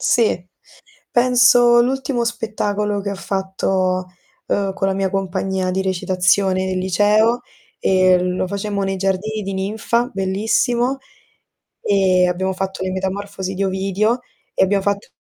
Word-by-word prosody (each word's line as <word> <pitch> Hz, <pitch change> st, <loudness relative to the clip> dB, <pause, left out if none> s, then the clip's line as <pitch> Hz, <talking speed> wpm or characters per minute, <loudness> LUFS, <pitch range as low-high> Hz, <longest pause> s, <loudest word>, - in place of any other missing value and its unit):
Sì, 220 Hz, -7 st, +2 dB, 0.7 s
penso 240 Hz, -1 st, +5 dB
l'ultimo 260 Hz, -1 st, -1 dB
spettacolo 210 Hz, -3 st, -2 dB
che 200 Hz, 0 st, -4 dB
ho 200 Hz, -, -3 dB
fatto, 190 Hz, -1 st, -1 dB, 0.4 s
uhm, 195 Hz, -1 st, 0 dB
con 195 Hz, -, -2 dB
la 190 Hz, -, 0 dB
mia 195 Hz, 0 st, -1 dB
compagnia 190 Hz, -1 st, -2 dB
di 190 Hz, +1 st, 0 dB
recitazione 185 Hz, +1 st, +1 dB
del 185 Hz, 0 st, -2 dB
liceo 210 Hz, +6 st, +2 dB, 0.4 s
e 185 Hz, -1 st, +4 dB
lo 180 Hz, 0 st, -1 dB
facemmo 200 Hz, +1 st, -3 dB
nei 195 Hz, 0 st, -2 dB
Giardini 195 Hz, +3 st, -2 dB
di 195 Hz, -, -4 dB
Ninfa, 220 Hz, +5 st, -1 dB
bellissimo, 225 Hz, +7 st, 0 dB, 0.8 s
e 185 Hz, -2 st, +3 dB
abbiamo 190 Hz, +2 st, -1 dB
fatto 190 Hz, 0 st, -4 dB
Le 185 Hz, -, -2 dB
metamorfosi 190 Hz, 0 st, -4 dB
di 195 Hz, +1 st, -1 dB
Ovidio 195 Hz, +5 st, 0 dB, 0.3 s
e -, -, +2 dB
abbiamo 195 Hz, +1 st, +1 dB
fatto 200 Hz, 0 st, -2 dB
195 Hz, 135 wpm, -19 LUFS, 190-215 Hz, 0.8 s, penso